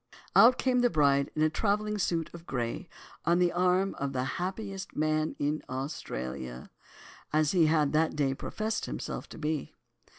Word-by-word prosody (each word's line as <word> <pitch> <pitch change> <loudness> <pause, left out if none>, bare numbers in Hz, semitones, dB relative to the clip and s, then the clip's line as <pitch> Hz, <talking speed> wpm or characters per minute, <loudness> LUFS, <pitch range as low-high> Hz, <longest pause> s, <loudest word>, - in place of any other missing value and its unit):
Out 245 +2 +8
came 255 -1 +2
the 245 0 +4
bride 140 -5 +3
in 155 0 +2
travelling 210 +3 0
suit 165 -3 -1
of 170 0 -11
grey, 125 +7 -3 0.3
on 170 +1 +3
the 175 -1 +3
arm 180 +2 +2
of 140 0 -2
"the 125 -1 0
happiest 190 - -4
man 155 +1 0
in 150 +2 -1
Australia," 65 - -5 0.6
as 155 -1 +3
he 170 -4 +4
had 155 -2 +2
that 160 +1 +2
day 140 -3 +1
professed 215 +10 -3
himself - - -5
to - - -10
be. 155 -2 -3
155 Hz, 160 wpm, -29 LUFS, 140-190 Hz, 0.6 s, Out